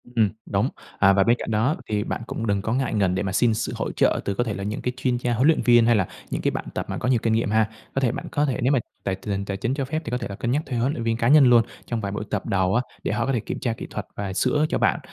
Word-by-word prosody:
Ừm, 110 -3 +4 0.2
đúng. - - 0 0.3
À, 100 -1 +6
và 95 0 +4
bên 115 +4 +4
cạnh - - -4
đó 115 +8 +2
thì 105 -1 0
bạn - - -4
cũng 115 - -4
đừng 100 -1 +1
có 110 +3 -2
ngại 130 -1 0
ngần 95 -4 +2
để 95 - -1
mà 95 - -2
xin 115 +4 +3
sự 110 +1 -2
hỗ - - -3
trợ - - +2
từ 100 - 0
có 120 - 0
thể 110 - -3
là 100 - -5
những 105 +3 -3
cái 125 - -2
chuyên 130 -2 0
gia 120 0 -1
huấn 125 +5 +3
luyện 160 - +4
viên 120 -2 +5
hay 120 0 +4
là 95 -4 +1 0.2
những - - -2
cái - - +1
bạn - - -4
tập - - -3
mà - - -3
có 125 - -1
nhiều 125 -3 +3
kinh 115 - +2
nghiệm 115 -1 +1
ha. 110 0 +2 0.3
Có 135 - +1
thể 125 -4 +2
bạn - - -5
có 145 -1 +1
thể 135 -4 -1
nếu 125 +3 +2
mà 135 - +3 0.2
tài 95 - -1
tình 95 +2 -6
hình 100 0 -2
tài 100 -1 -3
chính 115 +6 -1
cho 135 -1 -2
phép 155 +4 -2
thì 115 - -4
có 125 - 0
thể 120 - -4
là 100 - -5
cân 120 +4 -2
nhắc 145 +4 +1
thuê 130 -3 -3
huấn 125 +4 +1
luyện 120 - -4
viên 115 0 0
cá 115 - +1
nhân 145 +1 +7
luôn, 120 -2 +6 0.2
trong 115 -2 -3
vài 100 -2 -3
buổi 105 +1 -3
tập 105 - -2
đầu 95 0 +1
á, 120 - +3 0.2
để - - -1
họ 115 +3 0
có 135 - 0
thể 120 - +1
kiểm - - -5
tra 120 -3 -1
kỹ - - -8
thuật - - -5
và 100 -1 -4
sửa 150 +10 +2
cho - - 0
bạn. - - +2
115 Hz, 350 wpm, -24 LUFS, 100-125 Hz, 0.3 s, nhân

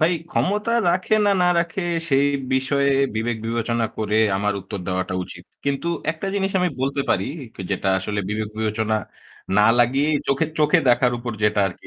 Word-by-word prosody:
ভাই 160 +3 +4 0.2
ক্ষমতা 210 +4 0 0.2
রাখে 185 +4 +1
না, - - +4
না - - +4
রাখে 170 +3 -1 0.3
সেই 140 -1 +3 0.3
বিষয়ে 140 +1 +1 0.2
বিবেক 115 +1 -1
বিবেচনা 115 0 0
করে 110 -1 -1 0.2
আমার 105 +1 0
উত্তর 100 +1 -7
দেওয়াটা 95 0 -2
উচিত। - - -12 0.2
কিন্তু 140 +4 -1 0.2
একটা 160 +4 -5
জিনিস 195 -1 0
আমি 180 - +2
বলতে 140 +1 0
পারি 95 - +1 0.3
কে - - -7
যেটা 95 0 -1
আসলে 105 +2 -4
বিবেক-বিবেচনা 110 +1 -1 0.6
না 105 - +6
লাগিয়েই 135 +5 +3
চোখে 140 +4 +2
চোখে 150 -1 +4
দেখার 125 0 +4
উপর 120 0 -4
যেটা 105 0 +3
আর 95 - -4
কি - - -15
120 Hz, 170 wpm, -22 LUFS, 105-150 Hz, 0.6 s, না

